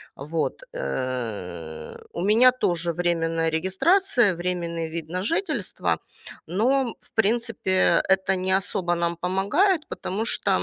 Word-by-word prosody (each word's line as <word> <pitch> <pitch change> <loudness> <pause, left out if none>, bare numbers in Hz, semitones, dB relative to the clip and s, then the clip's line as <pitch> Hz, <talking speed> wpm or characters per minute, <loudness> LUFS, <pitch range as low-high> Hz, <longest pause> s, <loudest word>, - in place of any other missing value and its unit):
Вот, 155 - -3
э, 100 - -4 0.2
у 170 - -4
меня 230 +5 +6
тоже 175 -8 0
временная 165 -1 0
регистрация, 210 - +2
временный 170 -2 -2
вид 165 -1 -5
на 180 +2 -3
жительство. 345 - -1 0.5
Но, 240 +7 +1
в - - -24
принципе, 225 -3 +2
это 190 0 +3
не 185 +1 -1
особо 185 -3 -1
нам 170 0 -1
помогает, 285 - +1
потому 210 +5 -3
что 205 - +2
185 Hz, 120 wpm, -24 LUFS, 165-225 Hz, 0.5 s, меня